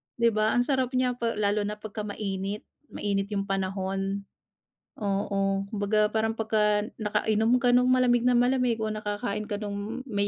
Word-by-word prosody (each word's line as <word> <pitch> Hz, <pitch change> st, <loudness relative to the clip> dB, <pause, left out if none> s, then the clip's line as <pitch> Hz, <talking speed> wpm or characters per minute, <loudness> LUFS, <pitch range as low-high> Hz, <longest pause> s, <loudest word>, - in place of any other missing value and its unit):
Di 235 Hz, -1 st, +3 dB
ba, 215 Hz, 0 st, +1 dB
ang 245 Hz, -, +4 dB
sarap 260 Hz, -1 st, 0 dB
niya 255 Hz, 0 st, +2 dB
pa 230 Hz, -1 st, -1 dB
lalo 205 Hz, 0 st, +1 dB
na 210 Hz, -, -3 dB
pagka 210 Hz, 0 st, -6 dB
mainit, 200 Hz, 0 st, -3 dB, 0.2 s
mainit 200 Hz, -5 st, -2 dB
'yung 200 Hz, -1 st, -2 dB
panahon. 195 Hz, 0 st, -2 dB, 0.8 s
Oo, 195 Hz, -1 st, 0 dB
kumbaga, 210 Hz, 0 st, +1 dB
parang 220 Hz, 0 st, 0 dB
pagka 210 Hz, -1 st, +2 dB, 0.2 s
nakainom 220 Hz, +2 st, +2 dB
ka 245 Hz, -, +5 dB
nung 250 Hz, +1 st, +4 dB
malamig 250 Hz, -1 st, +4 dB
na 250 Hz, -, +4 dB
malamig 250 Hz, -1 st, +2 dB
o 215 Hz, -, -1 dB
nakakain 210 Hz, 0 st, -3 dB
ka 210 Hz, -, -1 dB
nung 210 Hz, +4 st, -5 dB
may 205 Hz, -5 st, 0 dB
210 Hz, 165 wpm, -27 LUFS, 200-235 Hz, 0.8 s, ka